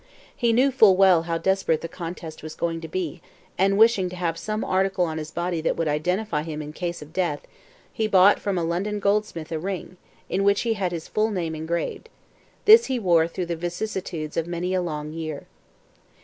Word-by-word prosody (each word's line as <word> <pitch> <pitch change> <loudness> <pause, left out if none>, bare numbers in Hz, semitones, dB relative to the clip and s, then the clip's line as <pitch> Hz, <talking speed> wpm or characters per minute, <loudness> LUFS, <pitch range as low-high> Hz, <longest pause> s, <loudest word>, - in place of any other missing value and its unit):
He 235 -2 +2
knew 255 +4 +4
full 215 -8 +6
well 190 -3 +6
how 165 - +1
desperate 190 -3 +1
the 165 - -4
contest 165 -2 -7
was 155 0 -8
going 165 -1 -2
to 165 - -6
be, 170 -1 -4 0.3
and 195 +2 +2
wishing 220 -4 +4
to 180 - -8
have 170 -2 -1
some 215 +5 -3
article 190 -1 +1
on 160 -1 -3
his 155 0 -6
body 175 -1 -2
that - - 0
would 165 - 0
identify 175 +4 0
him 155 -1 -5
in 150 0 -7
case 170 -1 -4
of 150 +2 -16
death, 175 -6 -1 0.5
he 220 -2 0
bought 195 0 +5
from 200 -2 -2
a 170 - 0
London 190 +5 -1
goldsmith 200 -6 -1
a 160 - -2
ring, 185 0 -5 0.3
in 195 +2 0
which 200 0 +3
he 230 -1 +1
had 190 -4 -2
his 165 -2 -5
full 215 +1 +1
name 175 -6 -2
engraved. 170 - -3 0.6
This 445 +2 +8
he 260 - 0
wore 170 -7 +3
through 180 +2 -4
the 170 0 -3
vicissitudes 175 -2 -4
of 165 0 0
many 175 +1 -2
a 185 - +1
long 150 -3 -4
year. 155 -3 -5
175 Hz, 205 wpm, -24 LUFS, 165-195 Hz, 0.6 s, This